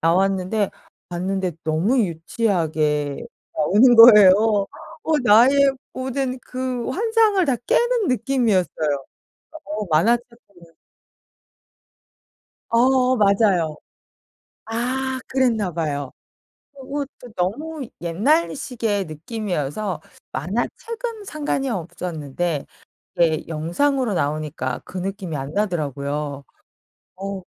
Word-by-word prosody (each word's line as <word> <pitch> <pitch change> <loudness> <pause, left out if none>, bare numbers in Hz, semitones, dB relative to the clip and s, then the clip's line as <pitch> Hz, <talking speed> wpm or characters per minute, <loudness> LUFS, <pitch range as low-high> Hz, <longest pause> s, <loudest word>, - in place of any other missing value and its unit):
나왔는데 190 +4 +1 0.4
봤는데 185 +1 -2
너무 170 +12 +2
유치하게 160 -6 0 0.4
나오는 210 +11 +5
거예요. 215 -5 +10 0.7
어 315 -2 +2
나의 270 +6 +6 0.2
모든 260 0 -3
그 255 -1 -4
환상을 440 - +2
다 260 -3 +2
깨는 480 -4 +2
느낌이었어요. 195 - 0 0.6
어 210 +1 -4
만화책 230 +10 +3 0.2
보면 170 -4 -20 2.0
어 255 +2 +3
맞아요. 195 -6 +2 0.9
아 260 +3 -2
그랬나 235 -8 +1
봐요. 145 -5 -3 0.6
그리고 280 +1 -4
또 245 -2 -12
너무 270 - -3
옛날식의 220 - 0
느낌이어서 175 - -4 0.3
만화책은 425 - -4
상관이 290 -5 -2
없었는데 165 - -3 0.5
이게 160 -3 +1
영상으로 215 - 0
나오니까 150 -5 -2
그 190 - -10
느낌이 190 -4 -4
안 135 +2 -5
나더라고요. 145 -6 -2 0.7
어 195 0 -5
200 Hz, 220 characters per minute, -22 LUFS, 165-255 Hz, 2.0 s, 거예요